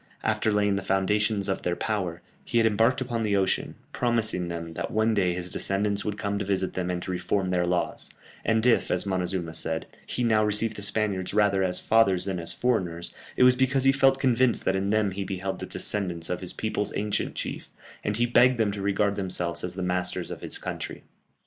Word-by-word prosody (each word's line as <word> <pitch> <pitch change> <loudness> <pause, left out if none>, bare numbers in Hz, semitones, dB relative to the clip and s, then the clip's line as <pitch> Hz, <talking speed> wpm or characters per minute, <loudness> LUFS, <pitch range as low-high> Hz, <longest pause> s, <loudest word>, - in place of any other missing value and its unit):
After 110 - +1
laying 105 -1 +2
the - - -2
foundations 100 +2 +1
of 95 - -1
their 90 - -1
power, 90 -6 -3 0.2
he - - -2
had 115 - +4
embarked 115 +5 +3
upon 120 -3 -2
the 105 -2 +1
ocean, 95 -1 0 0.2
promising 115 -7 0
them 85 -1 -5
that - - -4
one 110 +1 +2
day 90 -4 +1
his 90 0 -5
descendants 100 +1 0
would 105 -1 -3
come 100 -1 -2
to - - -1
visit 95 -1 -1
them 90 -1 -2
and 90 -1 -1
to - - -4
reform 90 +1 -1
their 90 -1 +1
laws 90 0 -1 0.3
and 110 +1 +1
if, 125 - +3
as - - +1
Montezuma 90 -3 -1
said, 80 0 -1 0.2
he 125 - -2
now 110 -2 +3
received 105 +1 +1
the 105 - -6
Spaniards 100 -2 0
rather 100 -2 +3
as 90 -1 0
fathers 95 -5 +3
than 95 -2 -2
as 85 - +1
foreigners, 90 -9 -1 0.2
it - - +5
was 125 0 +7
because 130 +1 +2
he 135 - +6
felt 135 0 +3
convinced 130 -2 +2
that 95 - +2
in 95 +1 -1
them 105 -1 +2
he 100 +1 -3
beheld 95 0 -4
the - - -6
descendants 90 -5 -2
of 90 - -2
his 90 - -4
people's 110 -2 -2
ancient 105 0 -1
chief, - - -5 0.3
and 105 0 -1
he 120 - +3
begged 120 +1 +4
them 110 -3 +1
to 100 0 -5
regard 100 +1 +1
themselves 90 -3 -1
as 90 0 -3
the 95 - -3
masters 90 0 0
of - - -7
his - - -4
country. - - -6
100 Hz, 215 wpm, -26 LUFS, 90-110 Hz, 0.3 s, was